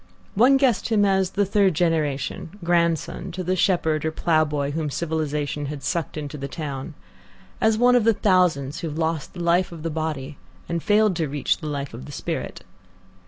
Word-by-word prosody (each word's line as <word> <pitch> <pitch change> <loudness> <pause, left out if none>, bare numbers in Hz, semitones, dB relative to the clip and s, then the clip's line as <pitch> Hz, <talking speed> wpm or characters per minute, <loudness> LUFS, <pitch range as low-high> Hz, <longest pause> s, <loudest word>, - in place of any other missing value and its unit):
One 255 +6 +5
guessed 260 -7 +2
him 210 -3 +3
as 190 -2 +2
the 205 +1 +1
third 195 -3 +2
generation, 160 +1 -1
grandson 170 +1 0
to 185 +1 -4
the 185 +1 0
shepherd 160 -5 +1
or 160 - 0
ploughboy 150 -3 +1
whom 155 0 -2
civilization 150 -2 -2
had 145 -1 -6
sucked 170 -1 -2
into 150 -1 -5
the 140 - -4
town; 145 0 -6 0.7
as 220 -1 +3
one 245 +2 +5
of 245 - +4
the 225 -1 +4
thousands 175 -9 +2
who 170 - -4
have 150 - -6
lost 160 -2 -2
the 175 - -4
life 175 +2 +2
of 165 -2 -9
the 165 - -2
body 150 -3 -4 0.3
and 170 0 -2
failed 210 -1 +3
to 160 -4 -1
reach 145 0 0
the 155 - -6
life 140 -2 -4
of 65 - -8
the - - -9
spirit. - - -5
165 Hz, 190 wpm, -23 LUFS, 150-185 Hz, 0.7 s, One